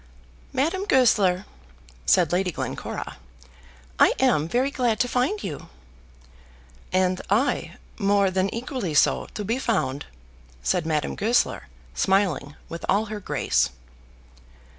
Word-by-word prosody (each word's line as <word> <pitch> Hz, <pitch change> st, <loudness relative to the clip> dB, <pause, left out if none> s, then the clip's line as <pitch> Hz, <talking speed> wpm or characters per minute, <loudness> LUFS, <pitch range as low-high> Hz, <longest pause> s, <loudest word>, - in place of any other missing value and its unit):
"Madame 330 Hz, +9 st, 0 dB
Goesler," 210 Hz, -, +3 dB, 0.6 s
said 170 Hz, -4 st, +4 dB
Lady 180 Hz, +1 st, +1 dB
Glencora, -, -, -5 dB, 0.8 s
"I -, -, +5 dB
am 155 Hz, 0 st, +3 dB
very 255 Hz, +9 st, +1 dB
glad 240 Hz, -5 st, 0 dB
to 245 Hz, -, +2 dB
find 255 Hz, -, 0 dB
you." 150 Hz, -, -6 dB, 1.2 s
"And 185 Hz, 0 st, +1 dB
I 230 Hz, +8 st, +1 dB, 0.2 s
more 200 Hz, -1 st, +3 dB
than 190 Hz, +1 st, 0 dB
equally 235 Hz, -, -4 dB
so, -, -, +3 dB
to 210 Hz, -, -4 dB
be 230 Hz, +6 st, -1 dB
found," 145 Hz, -, -1 dB, 0.6 s
said 175 Hz, -3 st, 0 dB
Madame 155 Hz, -2 st, 0 dB
Goesler, 230 Hz, +4 st, +1 dB, 0.3 s
smiling 190 Hz, -7 st, +1 dB
with 170 Hz, -, -7 dB
all 210 Hz, +2 st, +3 dB
her 210 Hz, -, -4 dB
grace. -, -, +1 dB
200 Hz, 120 wpm, -24 LUFS, 180-245 Hz, 1.2 s, I